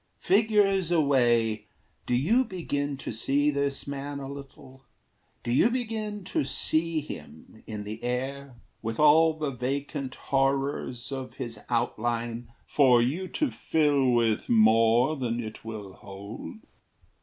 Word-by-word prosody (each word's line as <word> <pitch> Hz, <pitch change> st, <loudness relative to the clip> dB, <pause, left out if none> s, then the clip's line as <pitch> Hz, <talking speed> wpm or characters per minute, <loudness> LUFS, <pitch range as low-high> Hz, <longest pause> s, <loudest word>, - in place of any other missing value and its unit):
Figures 195 Hz, -3 st, +3 dB
away, 120 Hz, -9 st, +2 dB, 0.4 s
Do 125 Hz, -, +1 dB
you 215 Hz, -, +3 dB
begin 145 Hz, -, -3 dB
to -, -, -6 dB
see 140 Hz, +6 st, +1 dB
this 140 Hz, -1 st, -2 dB
man 140 Hz, 0 st, -5 dB
a 135 Hz, -, -6 dB
little? 135 Hz, -1 st, -11 dB, 0.6 s
Do 120 Hz, -, -2 dB
you 135 Hz, -, +4 dB
begin 220 Hz, -4 st, -3 dB
to 185 Hz, -, -1 dB
see 155 Hz, +4 st, 0 dB
him 110 Hz, -, -11 dB
in 105 Hz, -2 st, -5 dB
the 110 Hz, +3 st, -7 dB
air, 130 Hz, +2 st, -3 dB, 0.3 s
With 115 Hz, 0 st, -4 dB
all 160 Hz, +2 st, +6 dB
the 150 Hz, -3 st, -2 dB
vacant 135 Hz, +2 st, -3 dB
horrors 135 Hz, -2 st, -1 dB
of 130 Hz, -1 st, -6 dB
his 120 Hz, -5 st, -5 dB
outline 120 Hz, 0 st, -2 dB
For 130 Hz, -4 st, +5 dB
you 150 Hz, +11 st, 0 dB
to 295 Hz, -, -1 dB
fill 145 Hz, -4 st, +2 dB
with 115 Hz, -3 st, +1 dB
more 115 Hz, +5 st, +4 dB
than 120 Hz, -4 st, -2 dB
it 110 Hz, -2 st, -7 dB
will 105 Hz, -4 st, -7 dB
hold? 100 Hz, -, -9 dB
135 Hz, 130 wpm, -27 LUFS, 120-150 Hz, 0.6 s, all